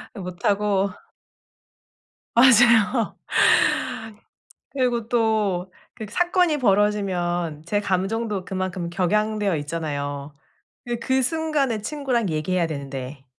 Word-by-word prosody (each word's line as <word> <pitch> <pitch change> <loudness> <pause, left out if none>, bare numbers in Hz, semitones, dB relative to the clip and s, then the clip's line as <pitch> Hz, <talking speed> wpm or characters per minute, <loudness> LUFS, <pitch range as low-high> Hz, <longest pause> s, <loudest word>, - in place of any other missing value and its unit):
못하고. 200 +1 0 1.5
맞아요. 235 -2 +5 1.6
그리고 245 -4 -1
또 215 -6 0 0.2
그 220 - -7
사건이 350 - +2
벌어지면 190 - 0
제 205 - +1
감정도 200 +1 -2
그만큼 185 -2 -3
격양되어 205 +2 0
있잖아요. 145 -2 -4 0.5
예 240 - -1
그 260 +3 0
순간에 290 -6 0
친구랑 255 -7 -1
얘기해야 165 +3 0
되는데 135 -2 -6
205 Hz, 215 characters per minute, -23 LUFS, 175-235 Hz, 1.6 s, 맞아요